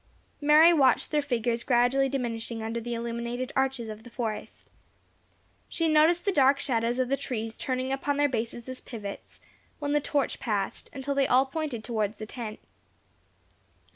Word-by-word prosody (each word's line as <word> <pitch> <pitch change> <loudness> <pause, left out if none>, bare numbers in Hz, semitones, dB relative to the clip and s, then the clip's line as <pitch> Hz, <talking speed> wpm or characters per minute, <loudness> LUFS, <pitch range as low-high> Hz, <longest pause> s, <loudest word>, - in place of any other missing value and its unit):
Mary 305 +3 +7
watched 270 -6 +3
their 300 -1 +2
figures 240 -4 -1
gradually 250 +3 +3
diminishing 230 -3 -3
under 225 +1 -3
the 240 +1 -4
illuminated 235 +2 -4
arches 265 -3 0
of 215 0 -7
the 240 - -13
forest. 230 -3 -5 1.0
She 330 - 0
noticed 320 +3 +4
the 400 - +3
dark 275 -4 +4
shadows 235 -1 0
of 255 -1 +1
the 275 - +1
trees 225 -4 -4
turning 255 0 -2
upon 280 +1 -1
their 290 0 +4
bases 235 -1 -4
as 255 0 -7
pivots, 210 -5 -8 0.4
when 290 -1 -2
the 295 - +3
torch 285 -1 -1
passed, 210 -6 -2
until 280 +1 -3
they 275 -1 +2
all 255 +2 +4
pointed 275 -5 -4
towards 220 -3 -2
the 215 - -6
tent. 220 -1 -7
255 Hz, 165 wpm, -28 LUFS, 230-280 Hz, 1.0 s, Mary